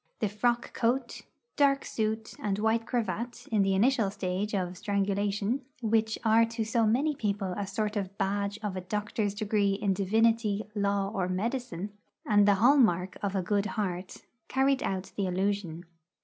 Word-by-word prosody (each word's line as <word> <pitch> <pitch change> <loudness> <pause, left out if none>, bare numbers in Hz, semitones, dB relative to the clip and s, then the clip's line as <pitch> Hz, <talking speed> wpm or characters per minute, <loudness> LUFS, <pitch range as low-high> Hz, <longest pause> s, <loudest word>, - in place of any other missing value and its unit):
The 215 - 0
frock 240 +4 0
coat, 240 +1 0 0.3
dark 275 -1 +3
suit, 220 0 -2
and 200 -2 -1
white 225 +2 +1
cravat 240 +1 -3
in 215 -2 +3
the 195 0 +2
initial 225 0 +3
stage 195 +2 -2
of 180 -2 -2
strangulation, 200 +4 0 0.2
which 220 0 +1
are 225 +1 +6
to 230 0 -2
so 225 +1 +1
many 275 +8 +2
people 200 -6 -2
a 200 -1 -3
sort 210 +2 -2
of 195 -1 -3
badge 200 +1 -1
of 205 -3 -2
a 185 - -3
doctor's 210 +1 -2
degree 205 -1 +1
in 200 -1 0
divinity, 215 +2 +2
law, 200 -1 0
or 185 -4 -1
medicine, 210 -1 -3 0.3
and 205 -2 +4
the 205 - +6
hall 245 +9 +5
mark 185 -7 +3
of 200 -1 -2
a 190 - 0
good 205 +2 +1
heart, 185 -3 -3 0.2
carried 270 0 +2
out 190 0 -3
the 200 -2 -1
illusion. 185 -2 -2
205 Hz, 165 wpm, -29 LUFS, 195-225 Hz, 0.3 s, are